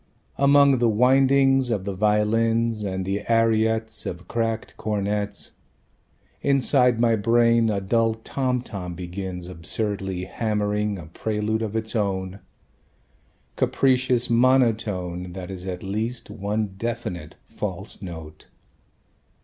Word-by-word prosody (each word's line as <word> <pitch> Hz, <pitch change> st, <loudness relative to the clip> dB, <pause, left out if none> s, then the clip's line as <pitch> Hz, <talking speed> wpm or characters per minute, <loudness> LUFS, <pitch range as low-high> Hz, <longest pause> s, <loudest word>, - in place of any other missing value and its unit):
Among 140 Hz, -1 st, +5 dB
the 120 Hz, -1 st, +3 dB
windings 135 Hz, +3 st, +4 dB
of 105 Hz, -5 st, -1 dB
the 100 Hz, -, -2 dB
violins 110 Hz, +2 st, +1 dB
And 95 Hz, -2 st, -3 dB
the 100 Hz, +2 st, -1 dB
ariettes 110 Hz, -1 st, +1 dB
Of 90 Hz, 0 st, -6 dB
cracked 115 Hz, -1 st, -2 dB
cornets 105 Hz, -1 st, -2 dB, 0.9 s
Inside 130 Hz, -3 st, +3 dB
my 115 Hz, -1 st, +4 dB
brain 115 Hz, +1 st, +3 dB
a 100 Hz, -2 st, 0 dB
dull 115 Hz, +3 st, +1 dB
tom 125 Hz, +2 st, -2 dB
tom 90 Hz, -7 st, -6 dB
begins 90 Hz, 0 st, -6 dB
Absurdly 95 Hz, +1 st, -3 dB
hammering 105 Hz, 0 st, -1 dB
a 85 Hz, -, -8 dB
prelude 105 Hz, +6 st, -2 dB
of 110 Hz, -1 st, -3 dB
its 110 Hz, +1 st, -2 dB
own, 95 Hz, -2 st, -1 dB, 1.2 s
Capricious 130 Hz, -2 st, +2 dB
monotone 110 Hz, -8 st, +1 dB
That 95 Hz, 0 st, -7 dB
is 95 Hz, 0 st, -7 dB
at 90 Hz, -1 st, -5 dB
least 110 Hz, +4 st, -3 dB
one 105 Hz, 0 st, -2 dB
definite 115 Hz, -9 st, -4 dB
"false -, -, -5 dB
note." 80 Hz, -4 st, -9 dB
110 Hz, 115 wpm, -24 LUFS, 95-115 Hz, 1.2 s, Among